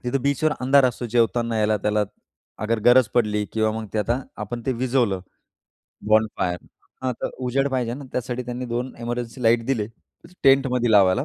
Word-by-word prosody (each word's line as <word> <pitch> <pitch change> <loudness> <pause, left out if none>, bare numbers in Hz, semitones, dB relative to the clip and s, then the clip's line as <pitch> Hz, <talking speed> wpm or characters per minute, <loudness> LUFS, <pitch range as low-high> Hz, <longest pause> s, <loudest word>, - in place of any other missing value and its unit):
तिथे 125 +3 0
बीचवर 140 +3 +1
अंधार 135 +2 +5
असतो 120 -1 -1
जेवताना 115 -1 +1
याला 105 0 +2
त्याला 105 +1 +1 0.6
अगर 115 +1 +1
गरज 120 -2 +6
पडली 105 -3 +2
किंवा 110 -1 +1
मग 110 0 -5
ते - - +1
आता 120 +5 0 0.2
आपण 120 +3 -6
ते 130 - +2
विझवलं 120 -5 0 0.9
बॉनफायर 110 -5 +2 0.4
...हां. 130 -1 0
तर - - -1 0.2
उजेड 135 +3 +1
पाहिजे 125 -3 -1
ना 140 +2 -8
त्यासाठी 125 0 -3
त्यांनी 125 +1 -5
2 120 +2 -3
एमर्जन्सी 120 +1 -4
लाईट 115 0 +3
दिले 115 -6 0 0.6
टेंटमध्ये 135 -3 +4
लावायला. 100 +6 +5
120 Hz, 165 wpm, -23 LUFS, 110-130 Hz, 0.9 s, गरज